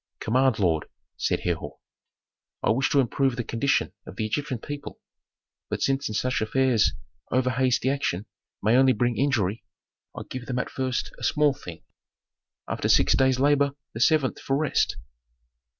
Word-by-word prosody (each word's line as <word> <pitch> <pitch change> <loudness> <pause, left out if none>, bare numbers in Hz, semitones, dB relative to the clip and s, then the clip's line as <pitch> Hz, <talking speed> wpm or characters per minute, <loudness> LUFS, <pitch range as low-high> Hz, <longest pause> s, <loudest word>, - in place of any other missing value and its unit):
"Command, 130 +1 +2
lord," 85 -6 +1 0.3
said - - -1
Herhor. - - -3 0.9
"I - - +3
wish 130 +4 +1
to 140 - +3
improve 135 0 +1
the 120 - -2
condition 115 +5 0
of - - -9
the 110 - -2
Egyptian 130 +4 -2
people. 145 +5 -7 0.7
But - - -2
since 135 0 +1
in 105 - -4
such 125 +1 0
affairs 125 0 +2 0.4
over 130 0 +2
hasty 130 0 +1
action 130 -8 -1 0.4
may 110 +3 +4
only 130 0 +5
bring 120 +1 0
injury, 115 -7 0 0.5
I - - -4
give 125 -1 -7
them 125 - -2
at 125 - -2
first 130 -2 -2
a - - -10
small 150 -2 +3
thing: 85 -10 -10 0.8
After - - -2
six - - +5
days' 130 -1 +3
labor 140 0 +3 0.2
the 115 - -6
seventh 145 +1 +2
for 135 - -1
rest." 155 -1 +1
130 Hz, 160 wpm, -26 LUFS, 115-135 Hz, 0.9 s, only